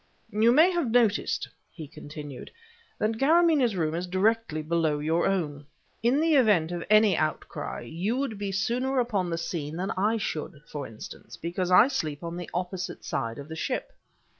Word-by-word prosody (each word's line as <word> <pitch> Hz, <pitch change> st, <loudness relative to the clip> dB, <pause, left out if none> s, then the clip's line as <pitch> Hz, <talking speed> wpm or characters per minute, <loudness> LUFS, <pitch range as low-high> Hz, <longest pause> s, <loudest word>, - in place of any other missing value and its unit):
"You 220 Hz, +3 st, +4 dB
may 320 Hz, +8 st, +6 dB
have 340 Hz, -8 st, 0 dB
noticed," 225 Hz, -3 st, +2 dB, 0.2 s
he 160 Hz, -4 st, -9 dB
continued, 145 Hz, -3 st, -9 dB, 0.5 s
"that 220 Hz, +1 st, -1 dB
Karamaneh's 305 Hz, -, +4 dB
room 160 Hz, -3 st, 0 dB
is 175 Hz, +2 st, -3 dB
directly 190 Hz, -3 st, +1 dB
below 160 Hz, -1 st, +1 dB
your 160 Hz, +3 st, +1 dB
own. 150 Hz, -7 st, -2 dB, 0.3 s
In 245 Hz, +5 st, +3 dB
the 325 Hz, 0 st, +3 dB
event 200 Hz, -10 st, +3 dB
of 175 Hz, -1 st, -3 dB
any 215 Hz, -2 st, +6 dB
outcry, 155 Hz, 0 st, -3 dB
you 175 Hz, -, -2 dB
would 265 Hz, -7 st, -2 dB
be 200 Hz, -1 st, -2 dB
sooner 245 Hz, +7 st, 0 dB
upon 205 Hz, -7 st, 0 dB
the 165 Hz, -, -2 dB
scene 160 Hz, -2 st, -4 dB
than 185 Hz, +3 st, -2 dB
I 210 Hz, +4 st, +1 dB
should, 155 Hz, -7 st, -4 dB
for 145 Hz, -2 st, -5 dB
instance, 110 Hz, -1 st, -10 dB
because 175 Hz, +2 st, -3 dB
I 185 Hz, +6 st, +7 dB
sleep 155 Hz, -, -3 dB
on 170 Hz, 0 st, -4 dB
the 175 Hz, -1 st, -6 dB
opposite 180 Hz, +1 st, -4 dB
side 115 Hz, 0 st, -3 dB
of 140 Hz, -, -8 dB
the 160 Hz, -, -7 dB
ship. 255 Hz, -, -3 dB
185 Hz, 175 wpm, -27 LUFS, 160-230 Hz, 0.5 s, I